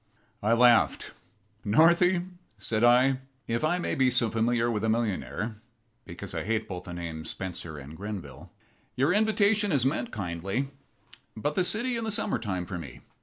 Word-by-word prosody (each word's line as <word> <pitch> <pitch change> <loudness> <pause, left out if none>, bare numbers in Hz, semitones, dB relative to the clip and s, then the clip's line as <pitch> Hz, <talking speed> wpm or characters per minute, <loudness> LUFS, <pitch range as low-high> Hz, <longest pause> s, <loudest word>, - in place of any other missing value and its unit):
I 110 +3 +2
laughed. 120 0 +4 0.5
"Northy," 175 - +4 0.3
said 110 0 -1
I 130 +2 +5 0.3
"if 115 +3 -1
I 165 +3 +2
may 175 - -2
be 130 -1 +3
so 120 -3 +2
familiar 120 +1 +1
with 105 -2 -2
a 110 - +1
millionaire, 110 -1 -2 0.5
because - - -8
I - - -3
hate 110 +1 -1
both 90 -3 -6
the 90 - -7
names 80 -2 -6
Spencer 85 -4 -6
and 70 +2 -10
Grenville 100 0 -7 0.4
your 140 +7 +2
invitation 210 -1 +3
is 135 -5 +2
meant 130 -3 0
kindly, 100 +6 -3 0.7
but 145 +7 -1
the 185 - +2
city 235 +6 +1
in 230 - -3
the 220 - -2
summer 210 - +1
time 95 -6 -3
for 90 -1 -5
me. 70 -7 -10
115 Hz, 170 wpm, -28 LUFS, 100-155 Hz, 0.7 s, I